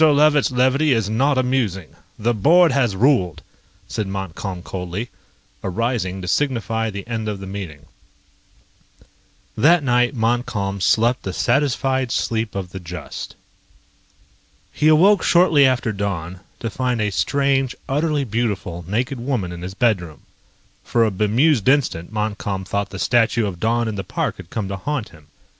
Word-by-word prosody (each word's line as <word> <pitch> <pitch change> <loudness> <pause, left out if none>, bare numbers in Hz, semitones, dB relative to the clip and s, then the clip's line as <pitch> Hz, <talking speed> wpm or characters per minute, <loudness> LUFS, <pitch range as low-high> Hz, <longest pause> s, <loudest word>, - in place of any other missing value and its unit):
Levitt's 150 -1 +5
levity 130 +3 +2
is 110 -3 0
not 135 +5 +2
amusing. 125 -9 0 0.3
The 120 +3 +1
board 165 - +5
has 125 -7 +1
ruled," 100 - +2 0.4
said 110 -3 -3
Montcalm 95 -1 -5
coldly, 90 +6 -5 0.5
arising 95 -2 -2
to - - -5
signify 115 -2 0
the 100 -1 -6
end 110 -2 -3
of 105 -2 -4
the 95 - -7
meeting. 90 -7 -7 1.7
That 165 +2 +4
night 125 0 +2
Montcalm 115 -4 -1
slept 120 +6 +2
the 95 - -5
satisfied 130 +1 +1
sleep 110 -3 -1
of 95 -3 -4
the 95 - -6
just. 85 -3 -8 1.4
He 150 - +1
awoke 185 +6 +5
shortly 165 -6 +5
after 125 -3 0
dawn 95 -3 -4 0.2
to 115 - -3
find 125 -1 -1
a 105 -1 0
strange, 135 +6 +1
utterly 150 +1 0
beautiful 100 -7 -2
naked 125 +6 -2
woman 120 -8 -2
in 85 0 -8
his 95 +2 -6
bedroom. 90 - 0 0.6
For 115 -1 +2
a 110 - 0
bemused 110 +6 +2
instant 125 - +1
Montcalm 105 -3 -3
thought 100 +1 -2
the 95 - -8
statue 115 +1 +2
of 95 -4 -5
Dawn 115 +2 +1
in 110 - -2
the 100 -2 -4
park - - -3
had 95 -2 -11
come 105 -1 -3
to 100 0 -4
haunt 135 +3 -3
him. 80 -4 -18
115 Hz, 150 wpm, -21 LUFS, 95-130 Hz, 1.7 s, Levitt's